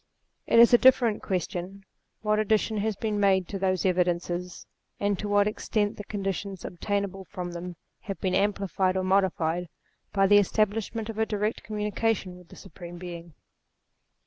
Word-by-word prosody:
It -, -, +3 dB
is 235 Hz, +1 st, +8 dB
a 240 Hz, -, +8 dB
different 245 Hz, -4 st, +4 dB
question 185 Hz, +1 st, -4 dB, 0.4 s
what 215 Hz, 0 st, +2 dB
addition 215 Hz, +1 st, +1 dB
has 215 Hz, +1 st, -1 dB
been 210 Hz, 0 st, -2 dB
made 190 Hz, -3 st, +3 dB
to 195 Hz, -, -4 dB
those 185 Hz, -1 st, 0 dB
evidences, 180 Hz, 0 st, -1 dB, 0.3 s
and 205 Hz, -1 st, 0 dB
to 210 Hz, -, -3 dB
what 205 Hz, 0 st, +4 dB
extent 210 Hz, 0 st, -1 dB
the 205 Hz, -, -6 dB
conclusions 195 Hz, -2 st, -4 dB
obtainable 195 Hz, +1 st, -3 dB
from 180 Hz, -3 st, -6 dB
them 175 Hz, +1 st, -6 dB, 0.2 s
have 195 Hz, -4 st, -6 dB
been 185 Hz, -1 st, -1 dB
amplified 195 Hz, -2 st, +1 dB
or 185 Hz, -, 0 dB
modified, 180 Hz, -3 st, +1 dB, 0.4 s
by 195 Hz, -1 st, +3 dB
the 205 Hz, +1 st, +7 dB
establishment 215 Hz, +2 st, 0 dB
of 220 Hz, -1 st, -5 dB
a 220 Hz, -, +3 dB
direct 210 Hz, +1 st, -1 dB
communi 210 Hz, -1 st, -4 dB
cation 215 Hz, -5 st, 0 dB
with 180 Hz, -1 st, -16 dB
the -, -, -13 dB
Supreme 175 Hz, -3 st, -10 dB
Being. 170 Hz, -2 st, -9 dB
195 Hz, 165 wpm, -27 LUFS, 180-210 Hz, 0.4 s, is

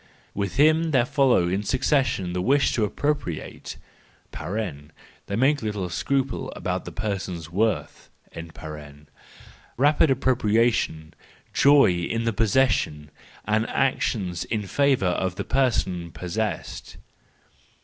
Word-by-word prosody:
With 100 Hz, -1 st, -3 dB
them 155 Hz, +3 st, +4 dB
there 130 Hz, -6 st, +3 dB
follow 135 Hz, -, +3 dB
in 95 Hz, +3 st, 0 dB
succession 130 Hz, -, 0 dB
the 90 Hz, -, -1 dB
wish 135 Hz, +8 st, +2 dB
to 115 Hz, -, +1 dB
appropriate 145 Hz, -, -3 dB, 0.5 s
(they 85 Hz, 0 st, -6 dB
make 135 Hz, +6 st, +2 dB
little 105 Hz, -4 st, -3 dB
scruple 135 Hz, +9 st, -1 dB
about -, -, -3 dB
the -, -, -7 dB
person's 95 Hz, -6 st, -4 dB
worth), 110 Hz, +5 st, -1 dB, 1.7 s
rapid 145 Hz, +4 st, +4 dB
appropriation, 115 Hz, -, +1 dB, 0.4 s
joy 140 Hz, -6 st, +6 dB
in 90 Hz, +7 st, -2 dB
the 115 Hz, -1 st, 0 dB
possession, 100 Hz, -, +1 dB, 0.3 s
and 110 Hz, +1 st, 0 dB
actions 100 Hz, -9 st, 0 dB
in 105 Hz, -2 st, -2 dB
favour 140 Hz, 0 st, +2 dB
of 90 Hz, 0 st, 0 dB
the -, -, -4 dB
person 95 Hz, -10 st, 0 dB
possessed. 90 Hz, +8 st, -4 dB
110 Hz, 110 wpm, -24 LUFS, 90-135 Hz, 1.7 s, joy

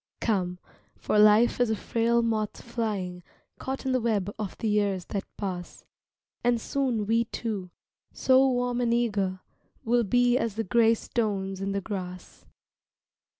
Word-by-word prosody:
Come, 185 Hz, -5 st, 0 dB, 0.4 s
for 210 Hz, -, +1 dB
life 215 Hz, +4 st, +5 dB
is 245 Hz, -2 st, +3 dB
a 220 Hz, -, +1 dB
frail 235 Hz, +2 st, +1 dB
moth 215 Hz, -2 st, -1 dB
flying 210 Hz, -7 st, -3 dB, 0.4 s
Caught 265 Hz, +1 st, -4 dB
in 265 Hz, -, +1 dB
the 255 Hz, -, +2 dB
web 205 Hz, -4 st, 0 dB
of 210 Hz, -3 st, -4 dB
the 225 Hz, -, -2 dB
years 205 Hz, -3 st, +1 dB
that 200 Hz, -2 st, -2 dB
pass, 180 Hz, -3 st, -5 dB, 0.6 s
And 240 Hz, -1 st, +2 dB
soon 245 Hz, -4 st, -1 dB
we 230 Hz, +2 st, +2 dB
two, 210 Hz, -5 st, -4 dB, 0.4 s
so 265 Hz, +1 st, +4 dB
warm 245 Hz, -1 st, 0 dB
and 235 Hz, -1 st, +2 dB
eager 200 Hz, -6 st, 0 dB, 0.4 s
Will 240 Hz, +1 st, +3 dB
be 245 Hz, +4 st, +3 dB
as 225 Hz, -6 st, -2 dB
the 225 Hz, -, -1 dB
gray 230 Hz, +3 st, +4 dB
stones 195 Hz, -5 st, -2 dB
in 195 Hz, 0 st, -2 dB
the 200 Hz, 0 st, -1 dB
grass. 185 Hz, -3 st, -7 dB
220 Hz, 150 wpm, -27 LUFS, 195-235 Hz, 0.6 s, life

